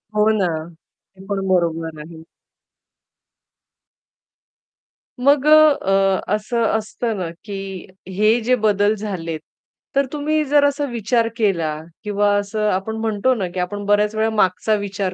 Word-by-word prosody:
हो 210 +1 +3
ना. 190 - +1 0.7
ते 190 - -14
पण 195 -1 -3
बरोबर 165 -3 0
आहे. 160 +1 -11 3.0
मग 280 +2 +3
अ, 305 - +6 0.3
अ, 195 0 +2 0.2
असं 230 +2 -2
असतं 220 0 -4
ना, 175 -3 -3 0.2
की 195 -2 -7 0.3
हे 215 +3 +4
जे 255 +3 +2
बदल 210 -2 +2
झालेत, 180 -6 -5 0.6
तर 275 - +3
तुम्ही 305 +1 0
जर 290 +1 +3
असा 285 0 0
विचार 230 0 0
केला 170 -8 0 0.3
किंवा 205 -1 +1
असं 210 +1 -1
आपण 195 +4 -2
म्हणतो 225 +3 +1
ना, 195 -5 -2
की 185 - -3
आपण 205 +3 -3
बऱ्याच 210 +1 +2
वेळा 220 +1 +1
मागचा 210 0 +1
विचार 200 -2 -3
205 Hz, 135 wpm, -20 LUFS, 190-225 Hz, 3.0 s, अ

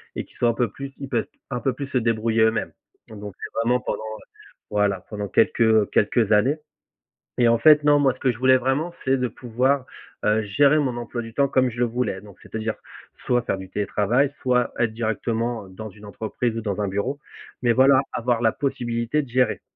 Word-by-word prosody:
et - - -4
qu'ils - - -23
soient 120 - +3
un - - +2
peu 120 -1 0
plus 135 +3 -8
ils 140 -1 -7
peuvent 120 -4 -1 0.2
un 125 -2 -2
peu 130 +2 0
plus 140 +2 -6
se 135 - -1
débrouiller 115 -1 +1
eux-mêmes 110 0 +1 0.4
donc 110 -2 -10
bon, 105 -1 -7
c'est - - -7
vraiment 125 +2 +1
pendant, - - -3
heu, 110 0 -7 0.5
voilà, 105 -2 +1
pendant 105 -2 -4
quelques, 110 - +2
heu, 110 -2 +4
quelques 110 +1 +2
années 110 +8 +3 0.8
et 120 - +5
en 115 0 +4
fait, 150 +5 +6
non, 145 0 +5
moi, 140 -3 +3
ce 130 - -19
que 130 - +2
je 115 - -9
voulais 130 +1 +5
vraiment 135 +7 -1
c'est 135 0 +2
de 125 -1 0
pouvoir, 125 +3 0 0.4
heu, 110 +1 +2
gérer 140 +8 +3
mon 135 -5 0
emploi 120 0 -5
du 115 0 -10
temps 140 +3 +2
comme 130 -1 +2
je 115 - -9
le 120 - +3
voulais. 115 -5 -2
Donc 100 -3 -15
c'est-à-dire 110 0 -4 0.5
soit 125 0 +2
faire 95 - -2
du 95 -1 -9
télétravail, 105 +7 +1
soit 125 -2 +1
être 120 -2 +1
directement, 115 0 -2
heu, - - -15
dans 110 +3 -8
une 105 +1 -14
entreprise 110 +3 -3
ou 115 - -3
dans 105 -1 -2
un 100 - 0
bureau 100 +9 -2 0.5
mais, 120 - +4
voilà, 130 +2 +6
avoir 120 -1 0
la 110 - +4
possibilité 120 +1 -1
de - - -11
gérer 125 +1 +1
120 Hz, 220 wpm, -23 LUFS, 110-130 Hz, 0.8 s, fait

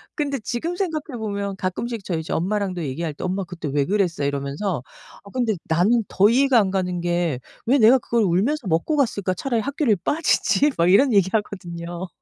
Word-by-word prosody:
근데 285 -3 -1
지금 255 - -3
생각해 315 -8 -3
보면 200 -2 -3
가끔씩 200 +4 -3
저 175 -4 -2
이제 160 - -4
엄마랑도 185 -1 -1
얘기할 150 +3 -3
때 - - -8
"엄마 190 +2 -1
그때 170 -4 -6
왜 140 -1 +1
그랬어?" 185 -6 0
이러면서 140 +4 -2 0.4
"어 200 - -13
근데 240 -3 0
나는 205 +8 +2
더 200 +2 +4
이해가 260 +1 +4
안 195 -3 +1
가는 180 -2 -1
게 175 -6 -1 0.3
왜 275 +3 +4
내가 245 +3 +6
그걸 235 -1 0
울면서 205 - +1
먹고 175 - 0
갔을까? 200 -8 0
차라리 235 -1 -1
학교를 280 -3 +1
빠지지." 300 -1 +2
막 170 +1 +3
이런 255 +4 +5
얘기하거든요. 185 -3 -1
200 Hz, 390 characters per minute, -22 LUFS, 175-240 Hz, 0.4 s, 내가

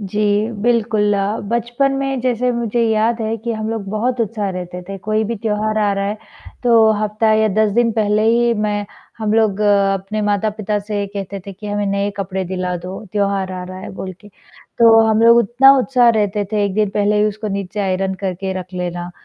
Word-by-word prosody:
जी, 210 +2 0
बिल्कुल, 220 -3 +2 0.3
बचपन 240 +4 0
में 270 -1 -2
जैसे 250 0 0
मुझे 235 0 -1
याद 225 +2 +1
है 220 +1 -1
कि 235 +2 -4
हम 215 -1 -4
लोग 225 -3 -3
बहुत 240 +3 -1
उत्साह 215 -2 -2
रहते 180 -1 -6
थे, 195 +2 -7
कोई 215 +3 -1
भी 230 +2 -2
त्योहार 215 0 -1
आ 205 -1 +2
रहा 195 0 -2
है, 205 +2 -2 0.5
तो 230 -3 +5
हफ्ता 215 +1 +1
या 215 0 +3
10 215 0 +3
दिन 235 +2 +2
पहले 210 -1 +1
ही 235 +1 +3
मैं 210 -1 -1 0.3
हम 215 -1 -1
लोग 215 -3 +2
अपने 200 0 +1
माता-पिता 210 0 -1
से 205 0 -3
कहते 200 0 -6
थे 200 - -6
कि 200 +3 -10
हमें 205 0 -1
नए 200 +1 0
कपडे 190 -1 -3
दिला 180 0 -3
दो, 180 +4 -8
त्योहार 200 -2 -1
आ 185 0 -5
रहा 185 +1 -8
है - - -8
बोल 190 0 -6
के, 205 - -15
तो 225 +3 +1
हम 220 0 +2
लोग 230 0 +7
उतना 245 +4 +5
उत्साह 250 -2 +3
रहते 210 -2 +1
थे 210 -1 +1
1 200 -2 -2
दिन 210 -1 +1
पहले 205 0 +2
ही 210 - +3
उसको 215 +1 -5
नीचे 200 +1 -4
आयरन 190 0 -1
करके 190 0 -3
रख 180 +1 -12
लेना। 175 -1 -4
210 Hz, 205 wpm, -18 LUFS, 195-225 Hz, 0.5 s, लोग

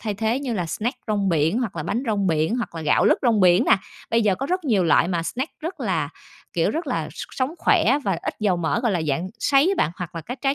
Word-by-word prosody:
thay 210 -2 -3
thế 225 +5 0
như 250 -5 -3
là 180 -4 -2
snack 235 - -3
rong 205 -3 0
biển 165 +5 +2
hoặc 220 -8 -3
là 155 - -2
bánh 235 - -2
rong 205 -3 0
biển, 160 +7 +1
hoặc 235 -8 -4
là 165 - -5
gạo 150 -1 +3
lứt - - +4
rong 230 -5 +3
biển 180 0 +5
nè. - - +5 0.3
Bây 230 0 +3
giờ 205 -3 +3
có 275 - -4
rất 365 0 -1
nhiều 205 -9 +2
loại 165 +1 +4
mà 170 -3 -1
snack 260 - -4
rất 335 +4 -6
là, - - -1 0.4
kiểu, - - +1
rất 325 0 -3
là, 250 - -2
s - - -6
sống 265 +4 -2
khỏe 260 +7 +3
và 190 -4 0
ít - - -3
dầu 195 -4 +2
mỡ, 170 +7 0
gọi 235 -5 +1
là, 170 -3 0
dạng 165 +7 -1
sấy 280 +7 +3
á 395 - +2
bạn, - - -3
hoặc 175 -2 -6
là 165 - -4
các 250 - -7
trái 270 0 +2
210 Hz, 280 wpm, -23 LUFS, 175-255 Hz, 0.4 s, biển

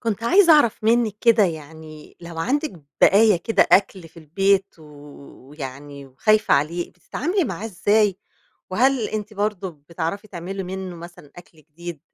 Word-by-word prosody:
كنت 225 -2 -3
عايزة 345 +8 +5
أعرف 235 -8 +3
منِك 225 -2 +2
كده 230 -3 +4
يعني، 155 -2 -8
لو 170 -1 -9
عندِك 290 - -1 0.3
بقايا 210 0 +5
كده 225 +7 +1
أكل 190 -3 +2
في - - -30
البيت، 195 +5 0
ويعني 145 -1 -11
وخايفة 215 +12 +2
عليه 165 +5 -1
بتتعاملي 345 - -2
معاه 195 - -5
إزاي؟ 205 -1 +1 0.5
وهل 245 +3 +1
أنتِ 215 0 -5
برضه 205 -2 -2 0.2
بتعرفي 170 +5 -4
تعملي 190 +2 -6
منُّه 185 -1 -6
مثلًا 170 -3 -13
أكل 175 -2 -15
جديد؟ 160 +1 -10
185 Hz, 140 wpm, -22 LUFS, 160-215 Hz, 0.5 s, عايزة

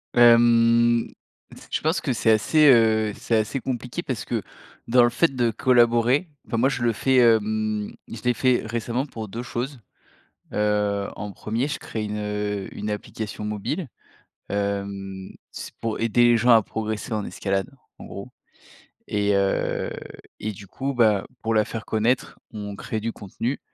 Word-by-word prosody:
Hem, 120 0 +5 0.6
je - - -1
pense 160 +3 +1
que 135 - -1
c'est 115 -1 +2
assez, 150 +8 +4
heu, 110 -3 +4
c'est 115 - -1
assez 110 +5 0
compliqué 125 +5 -4
parce 125 -9 -4
que, 115 -3 -2 0.5
dans 120 +1 +5
le 120 - +4
fait 150 +2 +1
de 120 -2 +2
collaborer, 120 - +3 0.2
enfin 115 - -2
moi 130 +4 +3
je 125 - -3
le 115 -1 +2
fais, 130 +4 +2
hem, 110 -2 +2 0.2
je 115 - -8
l'ai 125 - +3
fait 125 +3 +2
récemment 120 +3 -2
pour 110 -6 -7
2 115 +5 -6
choses. 125 +2 -4 0.7
Heu, 105 -1 0
en 105 +1 -5
1er, 115 +8 -2
je 150 - -4
crée 110 - -5
une, 105 0 -4
heu, 105 -1 -3
une 105 +1 -4
application 105 0 -5
mobile. 105 - -3 0.6
Hem, 100 -1 -3 0.2
c'est - - -8
pour 115 -1 -2
aider 115 +1 +3
les 120 0 +6
gens 120 +2 +3
à 115 -2 +7
progresser 110 +2 -4
en 105 -1 -2
escalade, 95 -1 -2 0.3
en - - -10
gros. - - -8 0.8
Et 105 -1 +1
heu, 100 0 0 0.5
et 110 - -3
du 100 +1 -11
coup, 135 +8 -3
bah, 110 -5 +3 0.2
pour 115 0 0
la 110 -1 +3
faire 110 -1 -6
connaître, 115 +3 0
on 105 -2 -6
crée 110 - -4
du 115 +1 -3
contenu. 115 +6 -4
115 Hz, 165 wpm, -24 LUFS, 105-120 Hz, 0.8 s, à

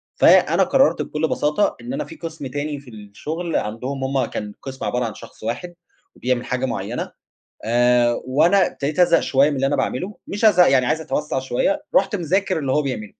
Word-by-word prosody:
فأنا - - +5
قرّرت - - +3
بكلّ 155 +1 -2
بساطة 150 +8 +1
إن 245 +2 -6
أنا 300 - -3
في 325 - -11
قِسم 160 - -7
تاني 145 +2 -4
في 135 -3 -15
الشغل 150 +12 -6
عندهم 125 +6 -3
هُم 135 0 0
كان 105 -1 -6
قِسم 135 -1 -6
عبارة 125 0 -1
عن 110 - -4
شخص - - -13
واحد 175 +11 -4 0.4
وبيعمل 125 0 -1
حاجة 125 +1 -1
معيّنة، 115 -1 -4 0.5
آآ 120 0 +3
وأنا 170 +8 +3
ابتديت 145 +4 -4
أزهق 175 -1 +5
شوية 140 +2 +3
من 145 - -2
اللي 135 0 +1
أنا 145 - +1
باعمله، 160 +9 -2
مش 205 +3 -1
ازهق 180 -7 +6
يعني 130 -2 +4
عايز 155 +6 0
أتوسّع 150 -3 -2
شوية، 280 - -1
رُحت 195 +2 +3
مذاكر 185 0 0
اللي 135 -3 -2
هو 150 - +2
بيعمله. 115 -7 -5
140 Hz, 190 wpm, -21 LUFS, 125-170 Hz, 0.5 s, ازهق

